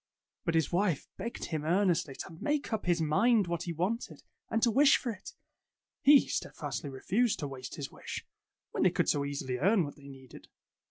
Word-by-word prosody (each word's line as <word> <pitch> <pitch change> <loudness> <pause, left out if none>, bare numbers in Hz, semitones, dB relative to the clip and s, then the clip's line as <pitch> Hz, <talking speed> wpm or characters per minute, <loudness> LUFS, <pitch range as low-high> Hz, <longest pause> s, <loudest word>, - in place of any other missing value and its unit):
But 170 - 0
his 160 -2 +2
wife 180 -4 +1
begged 235 - -5
him 155 -3 -3
earnestly 170 -4 +1
to - - -7
make 295 -4 -1
up 215 -4 -2
his 175 -1 +3
mind 210 +8 +3
what 170 -1 -3
he 170 - -3
wanted, 185 +9 -3 0.3
and 225 - +1
to 235 - +5
wish 275 +4 +6
for 245 - -3
it. 205 - -10 0.7
He 285 0 +7
steadfastly 145 - -4
refused 205 - 0
to 145 - -3
waste 130 -2 -7
his 145 -5 -6
wish, - - -7 0.5
when - - -2
they - - +6
could - - 0
so 145 - +2
easily 140 -3 -3
earn 195 - +4
what 145 - -7
they 140 -1 -14
needed. 135 -2 -13
175 Hz, 195 wpm, -31 LUFS, 145-220 Hz, 0.7 s, He